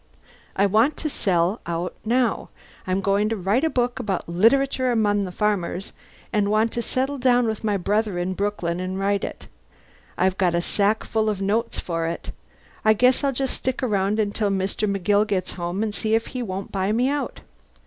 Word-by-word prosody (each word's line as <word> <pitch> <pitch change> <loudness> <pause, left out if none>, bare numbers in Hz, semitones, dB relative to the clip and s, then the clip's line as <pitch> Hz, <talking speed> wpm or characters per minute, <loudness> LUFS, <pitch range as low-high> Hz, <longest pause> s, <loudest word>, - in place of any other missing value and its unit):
I 200 - +3
want 220 +9 +3
to 305 - -3
sell 185 0 +1
out 170 +1 -3
now. 240 0 +1 0.4
I'm 185 +1 0
going 200 +2 +2
to 225 - 0
write 205 - +1
a 320 - +3
book 245 -2 0
about 205 -7 -2
'Literature 255 +8 +3
Among 205 -3 +2
the 185 - -6
Farmers,' 195 -2 -1 0.4
and 205 -2 +2
want 215 +2 +2
to 235 - -2
settle 265 +4 -1
down 245 -1 +3
with 220 -1 -2
my 210 -2 +1
brother 205 +1 0
in 180 +1 -1
Brooklyn 185 -3 -2
and 185 +1 -3
write 200 0 0
it. - - -6 0.7
I've 185 +1 +1
got 180 -3 +2
a - - +2
sackful 215 +2 +1
of 205 -3 -2
notes 215 +4 0
for 165 -2 -2
it. 165 - -5 0.5
I 215 - +6
guess 250 +5 +3
I'll 280 - +2
just 265 0 -2
stick 260 +1 -2
around 205 -2 +1
until 210 0 0
Mr. 195 +2 -1
McGill 205 +2 +2
gets 185 -3 -1
home 175 +3 -3
and 215 -2 -2
see 220 +1 +1
if 225 +1 0
he 255 - -3
won't 195 -3 -5
buy 195 +1 0
me 240 +4 +2
out. 285 +1 -2
210 Hz, 190 wpm, -23 LUFS, 190-230 Hz, 0.7 s, I